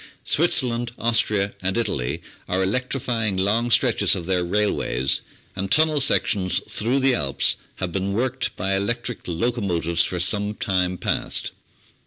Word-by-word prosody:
Switzerland, 125 -7 +1
Austria, 105 -3 0
and 95 +3 0
Italy 75 - -2 0.3
are 95 +1 +1
electrifying 115 -1 -1
long 110 +5 +1
stretches - - +3
of 85 - -5
their 90 -1 +1
railways, 85 -9 0 0.3
and 95 0 -3
tunnel 155 -2 +3
sec - - +3
tions 95 -3 +1
through 120 +6 0
the 135 -1 +3
Alps 70 - +2 0.2
have 95 -2 -3
been 95 +2 -2
worked 130 +4 -1
by 95 +1 -1
electric 120 +4 -2
locomotives 85 -4 0
for 90 - -3
some 105 +4 +2
time 90 -2 0
past. - - -1
100 Hz, 140 wpm, -23 LUFS, 90-120 Hz, 0.3 s, stretches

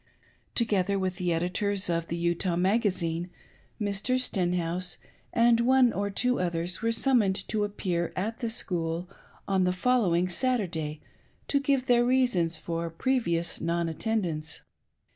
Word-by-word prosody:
Together 200 -4 +1
with 185 -1 -2
the 180 -1 0
editors 190 +4 0
of 170 -1 -1
the 170 - -3
Utah 170 +1 0
Magazine, 180 -3 0 0.5
Mr. 205 +4 0
Stenhouse 180 -5 -1 0.3
and 235 0 +4
one 250 0 +4
or 200 +1 -1
two 250 +5 0
others 175 0 -2
were 230 0 +1
summoned 225 -6 +2
to 215 -1 0
appear 180 -4 -2
at 220 +5 -3
the 235 - -2
School 170 -5 -1 0.4
on 190 -1 +2
the 180 - +2
following 185 -4 +2
Saturday, 175 - -1 0.5
to 280 - +2
give 275 -2 +1
their 240 -2 +4
reasons 240 -10 +2
for 165 +1 -3
previous 170 -3 -1
non 170 0 0
attendance. 165 -4 -2
185 Hz, 135 wpm, -28 LUFS, 170-230 Hz, 0.5 s, and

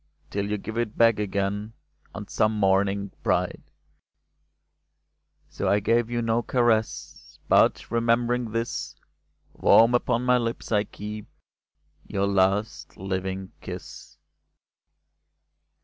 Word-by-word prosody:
Till 100 0 -2
you 105 - -1
give 110 +3 -5
it 115 -3 -3
back 115 -2 +4
again 100 +1 -2 0.4
On - - -7
some 110 +1 +1
morning 100 0 +1
bright." - - -1 1.8
So - - -4
I 100 - +3
gave 115 +3 +1
you 120 -1 -1
no 115 +1 +1
caress; 120 -3 -1
But, - - +3
remembering 120 +1 +1
this. 115 +1 -3 0.6
Warm 115 +2 +5
upon 120 0 +1
my 125 0 +3
lips 115 -1 -4
I 105 -1 +2
keep 105 +1 -8 0.8
Your 100 0 0
last 100 +2 0
living 95 0 -4
kiss - - -9
110 Hz, 110 wpm, -25 LUFS, 100-115 Hz, 1.8 s, Warm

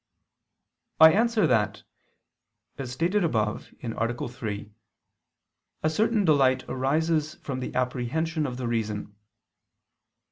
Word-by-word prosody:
I 160 0 +9
answer 230 0 +3
that, 110 -4 +1 1.0
As 130 -3 -4
stated 175 +9 +1
above 110 -9 -1
(A. 115 +1 -2
3), 105 -4 -6 1.1
a 155 - +3
certain 215 +4 +2
delight 135 -5 +3
arises 155 +4 0
from 130 -2 -5
the 130 - -5
apprehension 140 +6 -1
of 125 -1 -5
the 125 -2 -3
reason. 105 -3 -2
130 Hz, 105 wpm, -26 LUFS, 120-160 Hz, 1.1 s, I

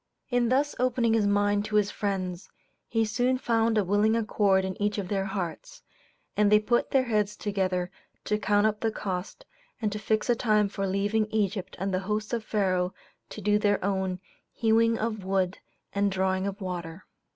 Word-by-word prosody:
In 245 -1 +2
thus 280 +3 +2
opening 245 -2 +2
his 215 -2 +3
mind 205 0 +2
to 215 0 -3
his 210 -1 +3
friends, 185 -3 -3 0.4
he 225 -1 +1
soon 245 +4 +1
found 230 -2 +1
a 210 - +3
willing 205 +4 +2
accord 205 -4 +2
in 190 +1 -5
each 205 0 0
of 195 -3 -3
their 195 -1 0
hearts, 195 - -5 0.5
and 210 0 +3
they 210 - +7
put 240 +3 +1
their 265 -1 +3
heads 210 -4 0
together 185 -4 -1 0.3
to 210 0 0
count 205 0 +2
up 215 -1 +1
the 225 - +1
cost 195 - -5 0.3
and 215 -3 -1
to 210 - -4
fix 215 +1 0
a 240 - +3
time 215 -3 +2
for 195 0 -3
leaving 205 +3 +1
Egypt 205 -3 -2
and 195 +1 -2
the 185 - +1
host 210 +2 -2
of 230 -2 -1
Pharaoh 185 -4 0 0.3
to 215 - -8
do 210 +1 +2
their 205 -1 +2
own 190 -2 -1 0.3
"hewing 230 0 +3
of 215 -2 -3
wood 190 -1 0 0.3
and 200 0 +1
drawing 190 0 0
of 200 +1 -5
water." 175 -1 -5
205 Hz, 185 wpm, -27 LUFS, 190-220 Hz, 0.5 s, they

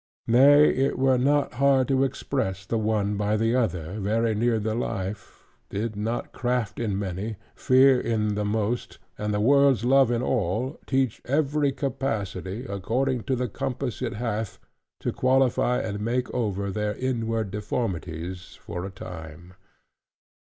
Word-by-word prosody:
Nay, 140 +5 +7
it 135 +1 0
were 130 -1 +3
not 145 +2 +2
hard 135 0 +3
to 135 0 +3
express 100 -8 -2
the 115 +3 -1
one 105 -2 0
by 105 +1 +1
the 115 +2 +1
other, 90 -5 -1
very 110 +3 +1
near 115 +2 +1
the 110 0 -1
life, 105 -4 -4 0.3
did 110 +2 -3
not 115 +3 -3
craft 125 -4 -2
in 105 -5 -1
many, 100 +3 -3 0.2
fear 130 0 +5
in 105 -2 0
the 105 0 -1
most, 110 +3 -2 0.2
and 105 0 -1
the 105 - 0
world's 135 0 +4
love 135 -1 +5
in 120 0 0
all, 120 - -1
teach 130 -4 0
every 145 +1 +1
capacity, 120 -6 -3
according 120 +4 -1
to 130 - +1
the 125 0 -1
compass 125 +2 -4
it - - -2
hath, 110 -2 -3 0.4
to - - -2
qualify 130 -1 +2
and 105 -4 -3
make 120 +4 -1
over 100 -5 -1
their 105 +1 -2
inward 115 -5 -2
deformities 95 -4 -4
for 90 +1 -6
a - - -5
time. 90 -2 -10
115 Hz, 150 wpm, -26 LUFS, 100-130 Hz, 0.4 s, Nay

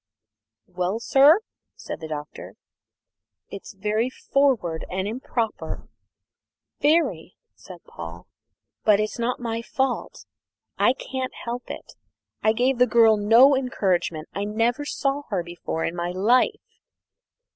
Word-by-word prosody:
"Well, 180 +4 -2
sir?" 285 - +5 0.3
said - - -7
the 160 - -7
Doctor. 150 -1 -7 1.0
"It's 195 - -9
very 215 +5 0
forward 255 - 0
and 190 +2 -2
improper 230 -1 -4 0.9
very," 285 - +1 0.2
said 180 -3 -13
Paul; 85 +1 -9 0.6
"but 210 -1 +5
it's 215 +2 -2
not 235 +2 -1
my 230 -1 -3
fault 265 +1 -3 0.5
I 250 - +3
can't 260 -1 -5
help 240 +1 -5
it. - - -8 0.5
I 220 - +4
gave 245 +3 +1
the 250 - +5
girl 225 -1 +5
no 230 +7 +6
encouragement. 185 -11 -1
I 200 - -2
never 230 +7 0
saw 275 0 -1
her 190 -5 -1
before 170 -1 -4
in - - -2
all - - -1
my - - -2
life!" 215 +8 +1
225 Hz, 125 wpm, -24 LUFS, 185-255 Hz, 1.0 s, no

